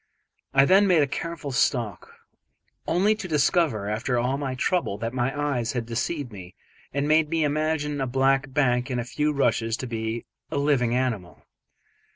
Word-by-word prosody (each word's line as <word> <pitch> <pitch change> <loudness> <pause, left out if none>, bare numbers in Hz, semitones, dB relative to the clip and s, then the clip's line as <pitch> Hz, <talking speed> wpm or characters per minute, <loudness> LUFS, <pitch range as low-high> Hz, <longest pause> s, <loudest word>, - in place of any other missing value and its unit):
I 135 0 +7
then 195 +5 +5
made 170 -5 +5
a 140 - -2
careful 165 -4 -5
stalk, 120 -7 0 0.8
only 195 +5 +3
to 210 -3 -6
discover, 150 - +1
after 115 +4 -1
all 125 +3 +1
my 135 -2 -3
trouble, 130 - 0
that 115 +2 -4
my 130 0 0
eyes 125 -6 -1
had 120 -3 -2
deceived 125 +4 -3
me 90 -3 -11 0.4
and 140 +1 -1
made 155 0 +3
me 165 -1 +1
imagine 150 -1 -1
a 135 - 0
black 135 +2 +1
bank 125 -2 +1
and 125 -2 -1
a - - -1
few 150 +4 0
rushes 115 -5 +1
to - - -5
be 115 -1 -4 0.2
a 155 - -3
living 135 -5 +2
animal. 115 -9 -3
135 Hz, 175 wpm, -25 LUFS, 120-150 Hz, 0.8 s, I